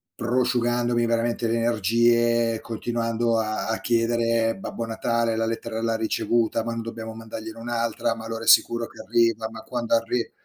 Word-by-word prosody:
prosciugandomi 120 Hz, -1 st, +1 dB
veramente 115 Hz, 0 st, 0 dB
le 115 Hz, +1 st, +1 dB
energie, 115 Hz, +1 st, +2 dB
continuando 115 Hz, 0 st, -1 dB
a 110 Hz, 0 st, -2 dB
a 115 Hz, -, -1 dB
chiedere: 115 Hz, -1 st, +1 dB
"Babbo 115 Hz, +4 st, -5 dB
Natale 115 Hz, 0 st, 0 dB
la 115 Hz, 0 st, 0 dB
lettera 115 Hz, 0 st, -3 dB
l'ha 115 Hz, 0 st, 0 dB
ricevuta? 115 Hz, 0 st, 0 dB
Ma 115 Hz, -, -3 dB
non 115 Hz, -, -3 dB
dobbiamo 115 Hz, 0 st, -6 dB
mandargliene 110 Hz, 0 st, -8 dB
un'altra? 115 Hz, -1 st, -1 dB
Ma 115 Hz, 0 st, -9 dB
allora 115 Hz, 0 st, -5 dB
è -, -, -8 dB
sicuro 115 Hz, 0 st, +5 dB
che -, -, -17 dB
arriva? 115 Hz, +1 st, +1 dB
Ma 110 Hz, 0 st, -9 dB
quando 120 Hz, 0 st, -3 dB
arri" 115 Hz, +1 st, -1 dB
115 Hz, 160 wpm, -24 LUFS, 115-120 Hz, -, sicuro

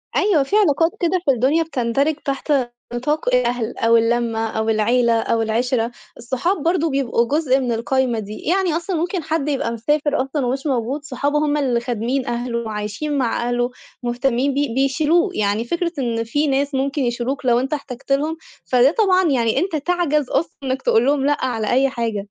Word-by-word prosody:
أيوه، 385 Hz, -8 st, +3 dB
في 275 Hz, -, -2 dB
علاقات 330 Hz, -5 st, +3 dB
كده 360 Hz, +1 st, +1 dB
في 275 Hz, -, +5 dB
الدنيا 270 Hz, +7 st, +2 dB
بتندرج 275 Hz, 0 st, 0 dB
تحت 275 Hz, +2 st, -1 dB, 0.4 s
نطاق 250 Hz, +1 st, 0 dB
الأهل 245 Hz, -2 st, -1 dB
أو 230 Hz, 0 st, +4 dB
اللمة 230 Hz, -1 st, +1 dB
أو 220 Hz, 0 st, -2 dB
العيلة 235 Hz, +2 st, +2 dB
أو 230 Hz, 0 st, 0 dB
العِشرة. 230 Hz, +1 st, 0 dB, 0.3 s
الصحاب 265 Hz, +9 st, -2 dB
برضه 330 Hz, -1 st, +1 dB
بيبقوا 260 Hz, -4 st, +1 dB
جزء 275 Hz, -2 st, +2 dB
من 250 Hz, -2 st, -1 dB
القايمة 240 Hz, +1 st, 0 dB
دي، 210 Hz, 0 st, -7 dB
يعني 365 Hz, -1 st, +1 dB
أصلًا 345 Hz, +2 st, -3 dB
ممكن 345 Hz, +1 st, -2 dB
حد 315 Hz, -2 st, -1 dB
يبقى 265 Hz, -5 st, -1 dB
مسافر 290 Hz, +5 st, 0 dB
أصلًا 270 Hz, 0 st, -2 dB
ومش 270 Hz, +4 st, -2 dB
موجود، 265 Hz, +3 st, -1 dB
صحابه 290 Hz, +1 st, -1 dB
هم 300 Hz, 0 st, +1 dB
اللي 255 Hz, -5 st, +1 dB
خادمين 245 Hz, +2 st, -2 dB
أهله 240 Hz, 0 st, -2 dB
وعايشين 220 Hz, +7 st, -3 dB
مع 240 Hz, -2 st, 0 dB
أهله، 245 Hz, 0 st, 0 dB, 0.3 s
مهتمين 245 Hz, +2 st, 0 dB
بيه، 280 Hz, -3 st, -1 dB
بيشيلوه. 300 Hz, -, +2 dB
يعني 210 Hz, -, 0 dB
فكرة 340 Hz, +5 st, -1 dB
إن 230 Hz, -3 st, -1 dB
في 290 Hz, +7 st, 0 dB
ناس 280 Hz, +1 st, 0 dB
ممكن 275 Hz, +2 st, -1 dB
يشيلوك 245 Hz, +3 st, -2 dB
لو 240 Hz, -1 st, +4 dB
أنت 270 Hz, +4 st, -2 dB
احتاجت 275 Hz, -2 st, -6 dB
لهم، 305 Hz, +4 st, +1 dB, 0.3 s
فده 255 Hz, +2 st, +4 dB
طبعًا 375 Hz, -4 st, +4 dB
يعني 235 Hz, 0 st, +1 dB
أنت 360 Hz, -1 st, -1 dB
تعجَز 305 Hz, -3 st, 0 dB
أصلًا 295 Hz, +5 st, 0 dB
إنك 265 Hz, 0 st, -2 dB
تقول 225 Hz, +2 st, +3 dB
لهم 275 Hz, 0 st, +2 dB
لأ 290 Hz, -2 st, +1 dB
على 225 Hz, -4 st, -2 dB
أي 270 Hz, +2 st, +3 dB
حاجة. 230 Hz, -6 st, -3 dB
265 Hz, 180 wpm, -20 LUFS, 235-295 Hz, 0.4 s, في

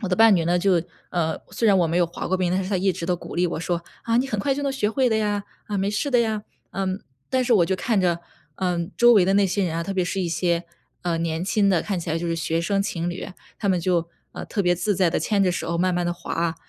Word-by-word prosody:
我 195 Hz, -, -1 dB
的 180 Hz, -, +1 dB
伴 225 Hz, -1 st, +7 dB
侣 170 Hz, -3 st, +1 dB
呢， 175 Hz, +1 st, +3 dB
就 175 Hz, -2 st, +3 dB, 0.3 s
呃， 160 Hz, -2 st, -1 dB
虽 215 Hz, +4 st, +1 dB
然 200 Hz, -, +5 dB
我 175 Hz, -2 st, +3 dB
没 165 Hz, +2 st, 0 dB
有 175 Hz, -, +3 dB
滑 170 Hz, -, -6 dB
过 185 Hz, -, 0 dB
冰， 180 Hz, -1 st, +1 dB
但 185 Hz, +1 st, 0 dB
是 190 Hz, -, -5 dB
他 190 Hz, -, +1 dB
一 195 Hz, +1 st, +2 dB
直 -, -, -5 dB
都 180 Hz, +1 st, +1 dB
鼓 175 Hz, -, -8 dB
励 180 Hz, +1 st, +2 dB
我 165 Hz, -, -3 dB
说： 170 Hz, 0 st, -2 dB, 0.2 s
“啊， 230 Hz, 0 st, +1 dB
你 250 Hz, +3 st, +2 dB
很 215 Hz, -6 st, -2 dB
快 270 Hz, +6 st, +1 dB
就 285 Hz, -, -4 dB
能 280 Hz, -1 st, 0 dB
学 240 Hz, -6 st, 0 dB
会 255 Hz, +1 st, +2 dB
的 220 Hz, -, +2 dB
呀。 205 Hz, -1 st, -1 dB, 0.2 s
啊， 205 Hz, -, -3 dB
没 195 Hz, +1 st, 0 dB
事 245 Hz, +8 st, -1 dB
的 245 Hz, -, +4 dB
呀。” 220 Hz, -2 st, -1 dB, 0.3 s
嗯， 190 Hz, 0 st, -2 dB, 0.3 s
但 260 Hz, -1 st, +1 dB
是 245 Hz, -, +2 dB
我 175 Hz, -5 st, +4 dB
就 190 Hz, -, +1 dB
看 220 Hz, +2 st, 0 dB
着， 175 Hz, -2 st, +1 dB, 0.4 s
嗯， 175 Hz, -2 st, -1 dB
周 240 Hz, 0 st, +7 dB
围 195 Hz, -4 st, +6 dB
的 190 Hz, -, +3 dB
那 200 Hz, 0 st, +4 dB
些 195 Hz, +1 st, 0 dB
人 165 Hz, -2 st, -2 dB
啊， 165 Hz, -, -1 dB
特 195 Hz, +4 st, -4 dB
别 185 Hz, -, +2 dB
是 180 Hz, -, -3 dB
一 175 Hz, -, -1 dB
些 170 Hz, 0 st, 0 dB, 0.4 s
嗯， 170 Hz, -2 st, -1 dB
年 165 Hz, 0 st, -2 dB
轻 200 Hz, +1 st, +2 dB
的， 180 Hz, -3 st, +3 dB
看 195 Hz, -3 st, -2 dB
起 165 Hz, -, -7 dB
来 160 Hz, -, 0 dB
就 170 Hz, -, -3 dB
是 165 Hz, -, 0 dB
学 165 Hz, 0 st, -1 dB
生 195 Hz, +3 st, +1 dB
情 175 Hz, -4 st, -2 dB
侣， 175 Hz, -, -5 dB, 0.3 s
他 205 Hz, -, -1 dB
们 185 Hz, -, +2 dB
就 170 Hz, -1 st, 0 dB, 0.2 s
呃， -, -, -7 dB
特 205 Hz, -, -1 dB
别 175 Hz, -1 st, +3 dB
自 205 Hz, +4 st, 0 dB
在 185 Hz, -1 st, +3 dB
地 -, -, 0 dB
牵 205 Hz, -2 st, +1 dB
着 185 Hz, -, +3 dB
手 170 Hz, -1 st, -2 dB
慢 185 Hz, +1 st, +2 dB
慢 175 Hz, 0 st, 0 dB
地 175 Hz, -, 0 dB
滑， 170 Hz, -1 st, -2 dB
185 Hz, 320 characters per minute, -24 LUFS, 170-205 Hz, 0.4 s, 伴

